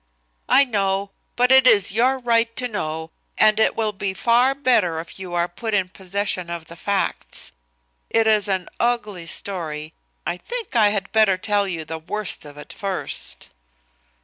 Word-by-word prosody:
"I 275 - +6
know. 195 -4 -1 0.2
But 250 +1 +3
it 265 -1 +7
is 205 -6 +5
your 250 +6 +2
right 230 -2 +1
to 250 - 0
know, 160 -7 -4 0.3
and 215 0 +4
it 220 - +3
will 220 -2 0
be 195 -1 -3
far 245 +4 +3
better 220 - +2
if 165 +3 -9
you 180 -2 -6
are 170 0 +1
put 220 +5 -4
in 190 -2 +1
possession 190 -1 -3
of 170 -1 -6
the 170 - -12
facts. 200 +3 -3 0.6
It 225 0 +2
is 215 -2 +3
an 190 -2 -1
ugly 215 -8 -1
story. 160 -4 -4 0.3
I 170 +2 -2
think 470 - -6
I 215 -3 +5
had 200 -1 -3
better 215 -4 +4
tell 205 +1 0
you 165 -4 -4
the 160 +1 -6
worst 195 +2 0
of 145 0 -12
it 150 - -10
first." 195 -3 -5
200 Hz, 175 wpm, -22 LUFS, 175-230 Hz, 0.6 s, it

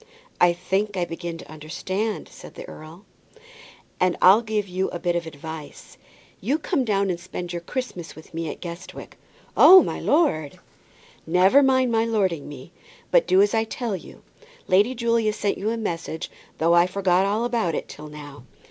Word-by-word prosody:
"I 175 - +6
think 190 +3 -2
I 175 - 0
begin 170 0 -6
to 165 - -12
understand 185 +7 -4
it," - - -19
said - - -12
the - - -9
earl, 160 - -12 0.9
"and 180 -1 +2
I'll 195 +5 +7
give 215 -3 -2
you 185 +1 -2
a - - -5
bit 175 0 -1
of 170 -1 -2
advice. 155 0 -9 0.4
You 265 +10 0
come 320 -3 -1
down 200 -4 +1
and 170 - -4
spend 175 0 -7
your 170 - -4
Christmas 180 -4 -6
with 155 - -15
me 165 -1 -3
at - - -8
Guestwick." 170 0 -9 0.4
"Oh, 375 +1 +9
my - - -4
lord!" 220 - +1 0.7
"Never 185 - +5
mind 260 -2 +3
my 225 0 +2
lording 195 -10 -1
me, 145 +3 -11 0.4
but - - +4
do 190 +2 +5
as 205 - 0
I 225 0 +2
tell 225 -1 -4
you. 180 - -12 0.4
Lady 205 +7 +3
Julia 230 -2 +1
sent 205 -1 -2
you 205 +3 -1
a 230 - -2
message, 165 -6 -4 0.3
though 165 +1 +3
I 175 +1 +5
forgot 185 0 +1
all 215 +4 0
about 225 -10 0
it - - -4
till 150 +1 -10
now. 145 -3 -11
185 Hz, 185 wpm, -24 LUFS, 170-220 Hz, 0.9 s, Oh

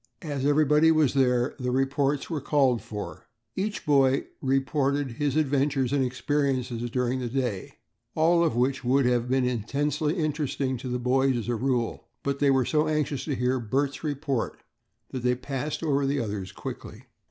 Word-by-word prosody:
As 145 -3 -2
everybody 150 +2 +4
was 155 -4 +3
there, 125 -2 +2
the 125 -1 -2
reports 135 +2 0
were 155 -4 -3
called 135 -5 +2
for. 105 -1 -7 0.3
Every 205 +2 -1
boy 135 -3 +3 0.2
reported 135 0 0
his 140 +3 -1
adventures 140 -3 +1
and 140 -2 +2
experiences 130 -2 -1
during 125 +1 0
the 125 -2 -3
day; 120 -6 -2 0.4
all 170 +2 +4
of 160 -9 +1
which 130 +2 +1
would 130 +2 +3
have 125 -1 +1
been 130 0 +2
intensely 140 - -1
interesting 150 -5 -1
to 130 +2 -7
the 125 - -1
boys 130 +1 +2
as 120 0 -4
a 120 - +1
rule, 120 0 -1 0.2
but 140 0 -1
they 145 - +3
were 135 -2 +3
so 155 +3 +1
anxious 150 -3 -1
to 145 - -1
hear 125 +1 0
Bert's 135 +6 -1
report 145 -4 -2 0.5
that 130 - -4
they 125 0 +2
passed 135 +4 -4
over 140 -3 +1
the 140 +1 0
others 105 -5 -4
rapidly. - - -7
135 Hz, 170 wpm, -26 LUFS, 125-145 Hz, 0.5 s, everybody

